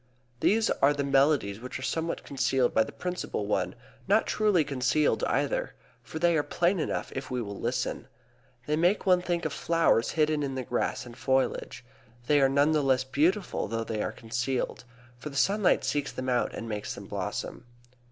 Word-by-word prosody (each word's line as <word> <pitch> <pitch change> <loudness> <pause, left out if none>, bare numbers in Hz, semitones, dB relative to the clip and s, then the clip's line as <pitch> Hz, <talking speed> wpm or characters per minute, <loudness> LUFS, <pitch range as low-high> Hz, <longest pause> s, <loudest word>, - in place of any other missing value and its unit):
These 220 +2 +3
are 145 +2 +5
the 145 - -1
melodies 135 -7 +2
which 125 +2 -6
are 130 - -8
somewhat 165 +4 -2
concealed 135 -2 +1
by 110 - +4
the - - -9
principal 180 - -4
one; 105 - -1 0.3
not - - +4
truly 210 -6 +2
concealed 140 +2 +1
either, - - -1 0.3
for - - -8
they 170 +1 +3
are 155 - +3
plain 175 +5 +1
enough 155 - -2
if 135 0 -5
we 125 - -2
will 100 -4 -5
listen. - - -2 0.6
They 150 - 0
make 175 +6 +2
one 180 -2 +4
think 175 -1 -2
of - - -2
flowers 165 -8 +2
hidden 155 -1 +2
in 135 -2 -2
the 130 - -3
grass 120 +1 -2
and 120 -1 -11
foliage. 130 -1 -1 0.4
They 145 +2 +4
are 135 - +5
none 140 +3 +3
the 155 -1 +2
less 130 -2 +2
beautiful 160 - 0
though 115 +2 -2
they 110 -1 -3
are - - -2
concealed; 120 +2 -3 0.3
for 150 - -6
the 140 - -11
sunlight 200 +5 +3
seeks 145 -2 -1
them 130 0 -4
out 125 -1 +1
and 115 - -6
makes 105 -2 -4
them - - -9
blossom. 120 - -5
140 Hz, 190 wpm, -28 LUFS, 125-165 Hz, 0.6 s, are